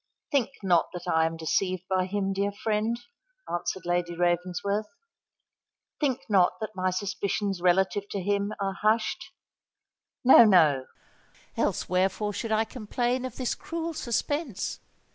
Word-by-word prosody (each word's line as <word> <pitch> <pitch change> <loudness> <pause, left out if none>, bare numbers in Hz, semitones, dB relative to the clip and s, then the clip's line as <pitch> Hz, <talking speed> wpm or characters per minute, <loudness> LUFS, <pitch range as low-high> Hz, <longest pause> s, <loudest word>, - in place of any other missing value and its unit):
think 275 -5 +2
not 175 -3 +3
that 175 0 -7
I 160 -2 +3
am 165 0 -5
deceived 185 +3 0
by 185 -1 +1
him, 195 0 -1
dear 200 +1 0
friend," 215 +3 -1 0.5
answered 175 +1 -3
Lady 175 0 0
Ravensworth: 180 +4 0 1.1
"think 270 -3 0
not 190 -5 +4
that 215 -1 -4
my 185 0 0
suspicions 195 0 -2
relative 190 +3 +2
to 200 - -3
him 200 +2 0
are 195 -1 -1
hushed. 215 +1 +1 0.9
No—no: 175 - +7 0.7
else - - 0
wherefore 190 +3 0
should 220 +3 -4
I 220 +1 +2
complain 245 +2 -2
of 255 -2 -6
this 255 -2 -1
cruel 330 0 -4
suspense? 275 - -2
200 Hz, 130 wpm, -27 LUFS, 180-220 Hz, 1.1 s, No—no